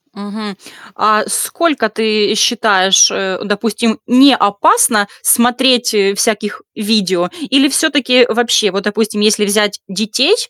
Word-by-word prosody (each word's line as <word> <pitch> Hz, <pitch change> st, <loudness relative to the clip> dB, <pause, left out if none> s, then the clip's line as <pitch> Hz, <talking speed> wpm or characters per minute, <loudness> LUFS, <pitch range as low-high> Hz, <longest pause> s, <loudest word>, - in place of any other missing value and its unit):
Мгм. 205 Hz, 0 st, -9 dB, 0.4 s
А 215 Hz, 0 st, +1 dB
сколько, 305 Hz, -10 st, -1 dB
ты 215 Hz, -1 st, -1 dB
считаешь, 200 Hz, -4 st, +3 dB
э, 190 Hz, -1 st, -4 dB
допустим, 220 Hz, +2 st, -2 dB
не 255 Hz, +2 st, +5 dB
опасно 210 Hz, -, +1 dB
смотреть, 245 Hz, 0 st, +1 dB
э, 200 Hz, -2 st, +1 dB
всяких 210 Hz, -1 st, -3 dB
видео? 195 Hz, -5 st, -1 dB, 0.2 s
Или 280 Hz, +2 st, +3 dB
всё-таки 265 Hz, -4 st, +2 dB
вообще 230 Hz, -3 st, +1 dB
вот, 200 Hz, +1 st, -4 dB
допустим, 210 Hz, 0 st, -3 dB
если 210 Hz, 0 st, +1 dB
взять 205 Hz, 0 st, -1 dB
детей, 220 Hz, -, 0 dB
215 Hz, 120 wpm, -13 LUFS, 205-245 Hz, 0.4 s, не